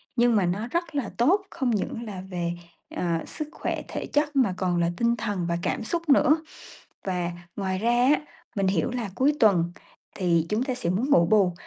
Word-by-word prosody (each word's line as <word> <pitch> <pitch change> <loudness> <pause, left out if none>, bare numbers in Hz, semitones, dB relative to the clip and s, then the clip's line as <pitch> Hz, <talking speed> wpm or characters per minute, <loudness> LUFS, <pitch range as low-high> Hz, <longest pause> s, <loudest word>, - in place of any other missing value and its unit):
nhưng 240 -2 +4
mà 195 - +3
nó 195 +6 -1
rất 340 +3 -2
là 270 -7 -1
tốt, 335 - +4
không 260 - -1
những 225 +2 -2
là 200 -4 -6
về, 175 -2 -2 0.4
ờ, - - -2 0.2
sức 305 -1 -5
khỏe - - -3
thể - - -4
chất 295 0 +1
mà 245 -9 +3
còn 180 -2 0
là 170 0 +2
tinh 235 0 +2
thần 205 -6 -2
và 170 - 0
cảm 230 - -1
xúc 335 +7 -3
nữa. 295 +2 +6 0.7
Và 180 -2 -1 0.3
ngoài 190 -2 -1
ra 230 +4 +1 0.2
á, - - -1 0.4
mình 195 -1 +1
hiểu 190 +2 +1
là 240 -5 -3
cuối 275 +6 +3
tuần 175 -6 +4 0.4
thì 170 -4 +1
chúng 215 +4 0
ta 260 -2 -2
sẽ 170 -9 -2
muốn 230 +10 0
ngủ 170 -11 +6
bù, 195 -1 +4
210 Hz, 205 wpm, -26 LUFS, 180-255 Hz, 0.7 s, nữa